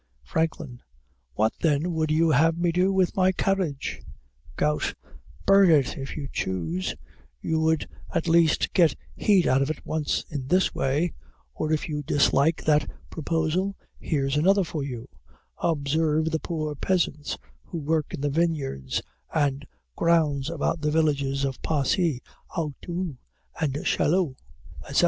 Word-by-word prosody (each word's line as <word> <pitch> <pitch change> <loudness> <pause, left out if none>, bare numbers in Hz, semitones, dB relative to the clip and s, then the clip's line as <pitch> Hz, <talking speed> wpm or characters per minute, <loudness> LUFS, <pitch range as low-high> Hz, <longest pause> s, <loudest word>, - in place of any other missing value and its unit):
FRANKLIN. 150 - -2 0.5
What 110 +1 +2
then 160 +2 +1
would 160 -1 0
you 160 +1 +3
have 160 +4 +4
me 170 0 +1
do 180 +3 +2
with 190 -2 +2
my 185 0 +4
carriage? 185 -7 -1 0.5
GOUT. 150 +6 0 0.5
Burn 195 -1 +6
it 145 -6 +4
if 135 +2 -6
you 145 -2 -4
choose; 90 -1 -2 0.4
you 160 - 0
would 160 0 +1 0.2
at 170 -2 -1
least 165 -1 +3
get 170 -4 +4 0.2
heat 195 -4 +3
out 130 +1 +3
of 135 - 0
it 155 - -5
once 155 -2 -1
in 140 -4 -4
this 185 +5 +2
way; 150 +6 0 0.4
or, 155 - -2
if 155 - 0
you 150 -2 -3
dislike 145 +2 +2
that 150 -1 +3 0.2
proposal, 165 +5 -1 0.2
here's 135 -3 0
another 195 +6 +4
for 160 -3 -4
you; 125 -3 -6 0.5
observe 155 0 +1
the 160 - 0
poor 155 -3 -3
peasants, 150 -2 -1 0.3
who 170 - -6
work 155 0 -1
in - - -5
the 145 - +1
vineyards 140 - -1 0.3
and 140 -2 0 0.3
grounds 155 -4 +2
about 165 0 -1
the 150 - +1
villages 140 -3 +1
of 135 -2 -4
Passy, 150 -1 +1 0.3
Auteuil, 165 0 -4 0.6
Chaillot, 170 -3 +2 0.5
etc. - - 0
155 Hz, 140 wpm, -26 LUFS, 140-170 Hz, 0.6 s, Burn